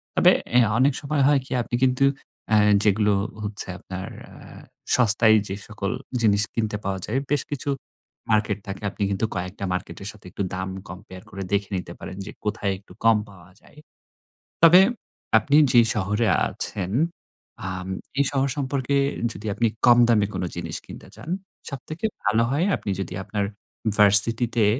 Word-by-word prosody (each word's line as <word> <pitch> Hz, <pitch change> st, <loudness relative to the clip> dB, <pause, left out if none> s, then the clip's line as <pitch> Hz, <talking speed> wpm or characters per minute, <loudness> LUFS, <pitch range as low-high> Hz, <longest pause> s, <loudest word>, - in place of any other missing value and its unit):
তবে -, -, +6 dB, 0.2 s
অ্যা 120 Hz, -3 st, +4 dB
অনেক 135 Hz, +2 st, +4 dB
সময় 145 Hz, 0 st, -1 dB
হয় 145 Hz, -1 st, +4 dB
কি -, -, -16 dB
আপনি 120 Hz, -, -3 dB
কিন্তু 130 Hz, +1 st, +3 dB, 0.4 s
অ্যা 110 Hz, -, +4 dB, 0.3 s
যেগুলো 105 Hz, 0 st, +3 dB, 0.3 s
হচ্ছে 105 Hz, 0 st, -4 dB
আপনার 95 Hz, 0 st, -7 dB, 0.3 s
আ -, -, -14 dB, 0.6 s
সস্তায় 110 Hz, -2 st, +5 dB
যে 95 Hz, -, -4 dB
সকল 105 Hz, -2 st, -4 dB, 0.3 s
জিনিস 105 Hz, -2 st, +3 dB
কিনতে 110 Hz, -2 st, -1 dB
পাওয়া 95 Hz, -1 st, -2 dB
যায়, 115 Hz, -, -2 dB
বেশ 145 Hz, -2 st, +2 dB
কিছু 145 Hz, 0 st, -3 dB, 0.6 s
মার্কেট 105 Hz, -1 st, +1 dB
থাকে। 100 Hz, +1 st, -6 dB
আপনি 100 Hz, -, -4 dB
কিন্তু 100 Hz, +3 st, 0 dB
কয়েকটা 90 Hz, +2 st, -5 dB
মার্কেটের 95 Hz, +2 st, -5 dB
সাথে 105 Hz, -2 st, -19 dB
একটু 100 Hz, -, -3 dB
দাম 95 Hz, +1 st, -4 dB, 0.2 s
কম্পেয়ার 90 Hz, +1 st, -10 dB
করে 100 Hz, -1 st, -6 dB
দেখে 100 Hz, 0 st, 0 dB
নিতে 90 Hz, -, -6 dB
পারেন, 95 Hz, -, -8 dB
যে 105 Hz, -, -7 dB
কোথায় 105 Hz, -1 st, -1 dB
একটু 100 Hz, -, -18 dB
কম 115 Hz, -1 st, +6 dB
পাওয়া 90 Hz, -2 st, -16 dB
যায়। -, -, -22 dB, 0.9 s
তবে 170 Hz, +2 st, +9 dB, 0.6 s
আপনি 140 Hz, +6 st, +1 dB, 0.2 s
যে 120 Hz, -, +7 dB
শহরে 105 Hz, +2 st, 0 dB, 0.2 s
আছেন, 95 Hz, -3 st, -3 dB, 0.8 s
আম 95 Hz, 0 st, -5 dB, 0.3 s
এই 140 Hz, -, +4 dB
শহর 135 Hz, 0 st, +1 dB
সম্পর্কে 140 Hz, -1 st, -1 dB, 0.4 s
যদি 105 Hz, -, -9 dB
আপনি 115 Hz, +3 st, +1 dB, 0.2 s
কম 120 Hz, 0 st, +7 dB
দামে 105 Hz, -4 st, +3 dB
কোন -, -, -3 dB
জিনিস 85 Hz, -2 st, -4 dB
কিনতে -, -, -11 dB
চান, 115 Hz, +8 st, -11 dB, 0.4 s
সবথেকে 155 Hz, -, -8 dB, 0.2 s
ভালো 110 Hz, +3 st, +3 dB
হয় 150 Hz, +7 st, +1 dB
আপনি 100 Hz, -, -5 dB
যদি 95 Hz, -, -5 dB
আপনার 105 Hz, 0 st, -2 dB, 0.5 s
ভার্সিটি 105 Hz, +3 st, +6 dB
তে 110 Hz, -3 st, +4 dB
105 Hz, 160 wpm, -24 LUFS, 100-125 Hz, 0.9 s, তবে